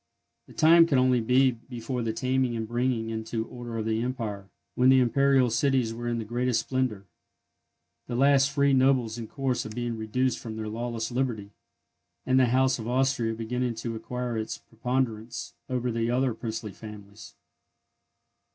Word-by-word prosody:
The - - -15
time 165 +1 +6
could 140 -5 +2
only 130 -1 +3
be 130 +3 +4
before 120 +1 -6
the 115 -1 -1
taming 130 +1 0
and 110 -1 -3
bringing 120 -1 -1
into 110 0 -3
order 120 -1 -7
of 110 - -2
the 110 0 0
empire, 110 -6 -4 0.2
when 125 +1 +4
the 130 0 +6
Imperial 130 0 +3
cities 125 -1 +1
were 120 +1 -5
in 120 0 -1
their 115 - -4
greatest 120 +1 0
splendour, 125 -6 -2 1.0
the 120 - -4
last 140 +1 +4
free 140 0 +2
nobles 130 -4 +2
in 115 - -6
course 135 -2 -2
of 110 -1 -8
being 120 -1 -2
reduced 120 +4 -1
from 110 -2 -7
their 110 -1 -4
lawless 115 +1 -3
liberty, 120 -5 -2 0.7
and 130 0 +3
the 130 - +4
House 130 +1 +2
of 110 - -6
Austria 125 -2 +1
beginning 120 +2 -2
to 115 0 -4
acquire 125 0 -4
its 110 - -4
preponderance 115 -1 -3 0.2
over 125 -1 -1
the 115 0 -1
other 125 0 +1
princely 110 -2 -5
families. 105 -1 -11
120 Hz, 170 wpm, -27 LUFS, 115-130 Hz, 1.0 s, time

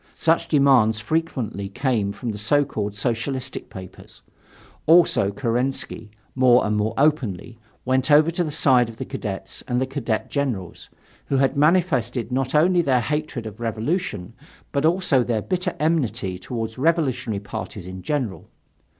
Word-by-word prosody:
Such 165 0 +2
demands 130 -7 +4
frequently 120 -8 -2
came 110 -3 0
from 115 +3 -5
the 105 - -6
so 145 +7 +3
called 105 -6 -4
Socialistic 125 +5 -3
papers, 95 -1 -12 0.6
also 165 - +5
Kerensky, 120 0 -2 0.2
more 125 -1 +4
and 105 0 0
more 105 +2 -1
openly, 120 - 0 0.3
went 130 +1 +1
over 150 +2 +5
to 175 +1 -1
the 160 - -3
side 130 -6 +3
of 115 - -11
the - - -5
Cadets 95 -3 -5
and 125 -1 0
the 130 - +1
Cadet 130 -5 -2
generals, 125 - -3 0.4
who 140 - +1
had 135 +1 +2
manifested 140 - +1
not 130 +2 -1
only 175 +3 +4
their 130 -6 +2
hatred 150 -3 -3
of 110 0 -8
revolution, 115 - -3 0.4
but 140 +2 +2
also 165 -7 +2
their 115 -3 -1
bitter 180 -1 -2
enmity 130 - 0
toward 115 +2 -5
revolutionary 130 -8 0
parties 100 -2 -7
in 95 0 -8
general. 125 -6 -3
125 Hz, 150 wpm, -23 LUFS, 110-150 Hz, 0.6 s, also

